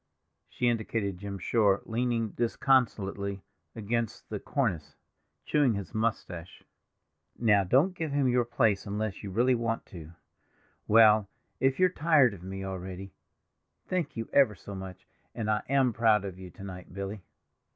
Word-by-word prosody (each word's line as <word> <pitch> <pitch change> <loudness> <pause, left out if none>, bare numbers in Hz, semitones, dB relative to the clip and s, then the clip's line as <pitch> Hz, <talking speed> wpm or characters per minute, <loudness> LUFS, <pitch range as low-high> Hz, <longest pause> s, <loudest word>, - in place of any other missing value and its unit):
She 125 - -1
indicated 110 -5 -1
Jim 100 0 -5
Shore, 100 +1 +2
leaning 115 -1 -1
disconsolately 100 -5 0 0.3
against 115 0 -3
the 105 - -4
cornice, 105 - -2 0.5
chewing 145 -7 +2
his 100 -2 -6
moustache. 100 -6 -3 0.7
"Now 105 -4 +4
don't 135 - +3
give 160 -4 -4
him 140 -2 +2
your 125 0 +3
place 115 -5 +1
unless 105 0 -3
you 100 - -6
really 120 +7 +2
want 115 -1 -1
to; 85 -2 -9 0.7
well, 110 -2 +6 0.3
if 135 +1 +1
you're 185 - +6
tired 150 - +3
of 95 - -11
me 95 +1 -6
already—thank 95 - -7
you 115 - -3
ever 135 -7 +5
so 100 - -10
much, 95 -1 -8 0.3
and 110 -2 -1
I 105 - +1
am 135 -3 +3
proud 110 -3 +3
of 95 -2 -7
you 95 -1 -9
to 95 - -13
night, 90 -2 -9
Billy!" 100 +1 -5
110 Hz, 145 wpm, -29 LUFS, 95-120 Hz, 0.7 s, well